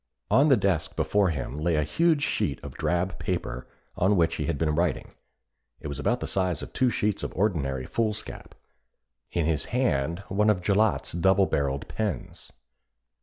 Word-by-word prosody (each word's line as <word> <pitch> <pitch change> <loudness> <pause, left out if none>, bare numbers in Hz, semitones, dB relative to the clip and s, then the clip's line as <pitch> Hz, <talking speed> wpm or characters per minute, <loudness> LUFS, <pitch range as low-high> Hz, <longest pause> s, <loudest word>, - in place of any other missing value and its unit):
On 140 +3 +5
the 135 - +6
desk 95 -5 0
before 90 +5 +2
him 70 -3 -4
lay 80 +1 +1
a 75 - +2
huge 155 - +2
sheet - - -1
of - - -7
drab 90 +2 -1
paper - - -3 0.3
on 95 +3 +3
which 85 -3 +2
he - - -2
had 85 -3 -1
been 75 0 +1
writing 85 +1 -1 0.7
it 75 - -6
was 70 0 -5
about 70 - 0
the - - -2
size 90 -5 -1
of - - -9
two 130 -2 +2
sheets 105 -3 -1
of - - -4
ordinary 70 -10 0
foolscap; 110 -2 -3 0.7
in 85 -3 -1
his 80 -2 0
hand 85 - 0
one 105 +3 +2
of 90 -4 +1
Gillott's 105 +3 +2
double 95 +4 +3
barrelled 70 -4 -1
pens. 105 -6 -4
90 Hz, 170 wpm, -27 LUFS, 75-105 Hz, 0.7 s, the